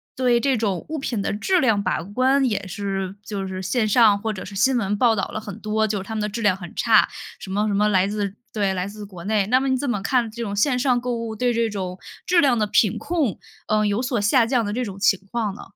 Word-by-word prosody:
对 250 -2 +2
这 265 0 +1
种 200 -6 -1
物 315 - -3
品 240 -6 -2
的 - - -1
质 355 - +1
量 225 -8 +2
把 200 - -1
关， 255 +9 +1
也 210 -6 0
是 195 0 -4
就 195 -2 -4
是 190 0 -5
线 215 +4 0
上 215 -1 +5
或 220 +1 -2
者 190 - -7
是 200 - -9
新 255 +7 +3
闻 205 -3 0
报 230 0 +4
道 195 - -1
了 - - -5
很 205 -3 -8
多， 215 +1 0
就 205 -1 -1
是 - - -6
它 220 +3 -6
们 215 - -1
的 210 - 0
质 215 +3 -5
量 205 -4 +2
很 175 -3 -10
差， 225 -2 +4 0.3
什 190 - -9
么 205 +2 0
什 205 - 0
么 210 +1 +3
来 190 -2 +3
自 205 -1 -3 0.2
对， 200 -3 0
来 185 0 -2
自 205 0 -8
国 180 -4 -11
内， 210 -1 +1
那 255 +4 +4
么 270 - -1
你 260 -1 +2
怎 280 +2 -3
么 240 -6 -1
看 240 +2 +1
这 235 - -7
种 205 -3 -3
线 250 +5 +2
上 250 -1 +2
购 245 0 -2
物， 230 -1 -4
对 245 +2 +1
这 230 -1 +1
种 190 -3 -5 0.3
质 350 -1 +4
量 265 -5 +3
的 215 - +2
品 210 -1 +2
控， 305 - -1 0.3
呃， 215 0 +2
有 205 +3 0
所 250 -2 -1
下 225 +4 +3
降 240 -2 +1
的 205 - -3
这 250 +3 -1
种 200 -4 -7
情 195 -1 +3
况 225 -4 -1
呢？ - - -10
215 Hz, 295 characters per minute, -22 LUFS, 200-245 Hz, 0.3 s, 上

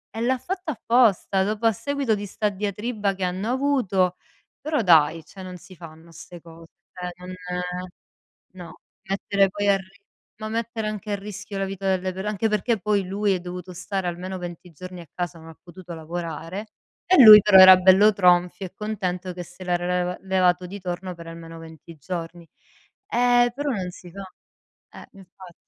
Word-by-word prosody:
E 225 - -4
l'ha 255 +2 +1
fatto 365 +4 -5
apposta, 230 - +2
dopo, 215 +3 -2
a 225 - +6
seguito 280 +2 -2
di 205 -1 -3
sta 210 +2 -1
diatriba 205 +1 -3
che 190 - -5
hanno 185 +4 -2
avuto. 245 -9 +1 0.5
Però 300 -5 -1
dai, 160 -3 +4
cioè 190 - -13
non 185 -1 -8
si 185 +2 -15
fanno 165 0 -13
'ste 175 +1 -12
cose, 165 0 -15 0.3
cioè 180 -1 -6
non 180 0 -9 1.2
no, 175 -3 -11 0.3
mettere 195 0 +1
poi 205 +1 -1
a 200 - +4
ri 195 +2 -16 0.4
ma 215 -1 -5
mettere 225 -1 -3
anche 210 0 -5
a - - +1
rischio 200 0 -8
la 195 - -1
vita 195 0 -4
delle 185 0 0
per 190 +2 -7
anche 210 +1 -1
perché 215 +2 0
poi 200 0 0
lui 200 +1 0
è 185 - 0
dovuto 180 +1 -8
stare 190 +1 -4
almeno 185 +2 -6
20 175 0 -8
giorni 185 +2 -10
a 170 - -11
casa, 175 -2 -5
non 160 - -14
ha 160 - -13
potuto 175 0 -11
lavorare 165 +4 -6 0.4
e 365 -8 +6
lui 215 -1 +12
però 200 -1 +5
era 185 0 +10
bello 190 +3 +6
tronfio 180 -1 +2
e 180 - -10
contento 185 -4 -4
che 180 0 -7
se 175 +2 -13
l'era 175 -1 -1
leva 180 0 -1
levato 185 -1 +1
di 200 +1 -9
torno 180 0 -5
per 170 0 -11
almeno 165 0 -10
20 165 0 -13
giorni. 170 +2 -7 0.6
Eh 245 - +3
però 290 0 -2
non 185 -5 -3
si 175 0 -13
fa. 195 +2 -8 0.8
Eh, - - -13
infatti. 185 -2 -15
190 Hz, 185 wpm, -23 LUFS, 175-210 Hz, 1.2 s, lui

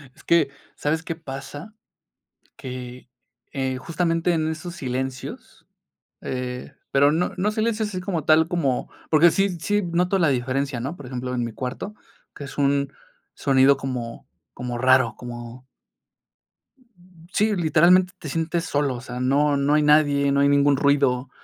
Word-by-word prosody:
Es - - -19
que, 165 -5 +3 0.3
¿sabes 160 +2 -1
qué 165 - -4
pasa? 145 +5 -8 0.8
Que, 125 -1 -8 0.4
eh, 130 -2 -2
justamente, 165 +4 0
en 160 -1 0
esos 170 +2 -6
silencios, 130 0 -5 0.6
eh, 125 -1 -5 0.2
pero 140 +1 +5
no 170 +3 0
no 205 +3 +1
silencios 220 0 -1
así 185 -3 -4
como 180 -5 -2
tal 155 +1 +5
como, 155 -8 -1 0.2
porque 165 +1 +6
sí, 195 -2 0
sí 205 +5 +1
noto 180 +2 +1
la 165 -4 +4
diferencia, 130 0 -1
¿no? 135 +8 -4
Por 140 - -10
ejemplo, 125 0 -4
en 120 -1 -1
mi 115 - -4
cuarto, 130 - -5 0.4
que 145 - -8
es 135 - -10
un 140 0 +1 0.4
sonido 135 0 +4
como 125 -3 -5 0.3
como 125 -1 -5
raro, 130 -2 +4
como 120 +1 -9 1.7
sí, 210 0 +2
literalmente, 175 +2 +4
te 150 - -7
sientes 165 +3 -1
solo, 145 -4 0
o 120 - -7
sea, 125 -1 -7
no 140 +3 +2
no 140 +1 +2
hay 150 - +4
nadie, 145 -2 +4
no 140 - +2
hay 140 0 +4
ningún 140 0 +4
ruido, 140 -2 +2
140 Hz, 155 wpm, -23 LUFS, 130-165 Hz, 1.7 s, porque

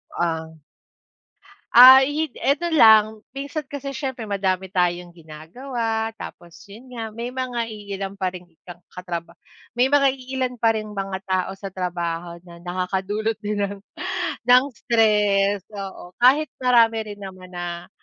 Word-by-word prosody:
Ah. 160 -1 -2 1.2
Ah, 255 +2 +11
yun 295 +3 -1
eto 315 +5 0
lang. 220 -6 +6 0.2
Minsan 280 +1 -5
kasi 280 -1 -6
siyempre 265 -4 -5
madami 190 -2 -2
tayong 175 -1 0
ginagawa 220 - -5
tapos 175 -6 -11
yun 235 +5 -13
nga 225 -1 -5
may 235 +2 -5
mga 250 -2 -3
iilan 200 -3 -6
pa 190 -2 -2
ring 180 -1 -11 0.2
ka 175 -1 -11
katraba 170 -2 -7 0.4
may 255 +3 +2
mga 280 -1 +5
iilan 260 -1 -4
pa 225 -1 +2
ring 215 -1 -5
mga 195 -1 -3
tao 185 0 0
sa 200 - -6
trabaho 175 -2 -4
na 170 0 -13
nakakadulot 190 +5 -2
din 205 0 -2
ng 200 0 -2 0.7
ng 250 +1 +7
stress, 205 -4 +2
oo. 190 -2 -8
Kahit 270 +6 +5 0.2
marami 230 -2 +5
rin 205 -1 -9
naman 185 -2 -10
na 175 -1 -6
205 Hz, 140 wpm, -22 LUFS, 180-245 Hz, 1.2 s, Ah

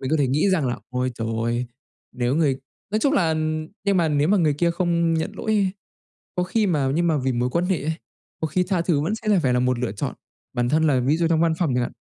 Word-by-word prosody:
Mình 130 - -3
có 160 - +3
thể 140 - +3
nghĩ 150 +9 +2
rằng 165 -7 +1
là, 120 -1 -1
ôi 125 0 -1
trời 115 -1 -4
ơi, 120 +1 -1 0.5
nếu 125 +1 0
người 145 -5 +2 0.3
nói 215 - +1
chung 275 +6 +2
là 170 - +2 0.5
nhưng 200 -1 +2
mà 170 -3 +3
nếu 150 +1 +2
mà 210 - +4
người 155 -6 +2
kia 170 +4 +1
không 170 -1 +1
nhận 160 - -1
lỗi 220 - -3
ấy, 200 -3 +2 0.6
có 180 - 0
khi 210 +4 +1
mà 145 -7 +1
nhưng 170 +2 +1
mà 160 - +2
vì 130 -1 0
mối 120 +1 0
quan 170 +6 0
hệ 185 -5 0
ấy, 155 +3 -1 0.5
có 160 - 0
khi 170 +4 0
tha 180 -1 0
thứ 170 -4 +1
vẫn 165 +9 -1
sẽ 215 -3 +1
phải 130 - +2
là 125 - +2
một 125 -1 +1
lựa 120 -5 -2
chọn. 100 - -4 0.4
Bản 120 0 0
thân 155 +4 +2
là 135 -4 +3
ví 135 +5 +2
dụ 170 0 +1
trong 160 -1 +2
văn 165 -1 +3
phòng 160 -8 +1
chẳng 125 - +1
hạn, - - -3
160 Hz, 275 wpm, -23 LUFS, 130-180 Hz, 0.6 s, mà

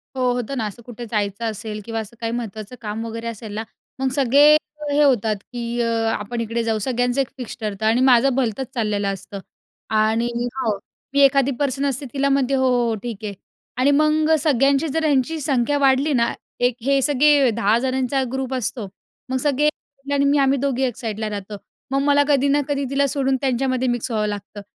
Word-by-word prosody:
हो, 255 -1 +1
होतं 245 +2 -3
ना 225 - -1
असं 210 +3 -10
कुठे 240 -1 -8
जायचं 205 0 -1
असेल 215 0 -6
किंवा 225 -1 -3
असं 220 +1 -8
काही 230 0 -2
महत्त्वाचं 220 -1 -6
काम 220 +1 -4
वगैरे 230 +1 -5
असेल 220 -2 -7
ना, 220 - -3 0.4
मग 265 0 +1
सगळे 285 +2 +6 0.4
हे 295 +1 +4
होतात 230 -6 +3 0.2
की 240 0 -3
अ 235 - +1 0.3
आपण 230 +3 -4
इकडे 230 +1 -2
जाऊ, 225 -1 0
सगळ्यांचं 245 +3 0
एक 270 - -2
फिक्स 250 -2 -7
ठरतं 210 -1 -3
आणि 225 +3 +3
माझं 260 0 +4
भलतंच 255 -1 -1
चाललेलं 210 -4 -1
असतं. 195 +1 -8 0.5
आणि 220 +2 +2 0.3
हो, 225 -6 -1 0.4
मी 280 - +2
एखादी 275 0 +4
पर्सनल 280 0 0
स्थितीला 275 +1 -2
म्हणते, 275 -1 +1
"हो, 265 -1 +2
हो, 245 -1 +2
हो 225 - 0
ठीक 235 -3 -4
आहे." 205 -1 -4 0.4
आणि 260 +3 +3
मग 305 +2 +3
सगळ्यांची 275 +1 +2
जर 320 +2 -1
ह्यांची 295 +2 +1
संख्या 280 -1 +1
वाढली 275 +2 +3
ना, 235 -2 +2 0.3
एक 245 -1 +2
हे 275 +1 +2
सगळे 285 -1 +4
10 220 0 +2
जणांचा 265 +1 0
ग्रुप 265 0 -3
असतो, 235 -3 -3 0.4
मग 260 - 0
सगळे 290 +2 +2 0.4
आणि 280 0 +2
मी 285 +1 +3
आम्ही 275 0 +3
दोघी 270 -1 0
1 250 -4 0
साईडला 220 -3 -3
राहतो. 205 0 -6 0.3
मग 275 0 +1
मला 285 0 +4
कधी 285 -1 +3
ना 285 +1 +3
कधी 285 -1 -1
तिला 275 +1 +2
सोडून 270 -1 0
त्यांच्यामध्ये 255 -1 0
मिक्स 240 +1 -1
व्हावं 215 -2 0
लागतं. 205 0 -6
250 Hz, 195 wpm, -21 LUFS, 225-275 Hz, 0.5 s, सगळे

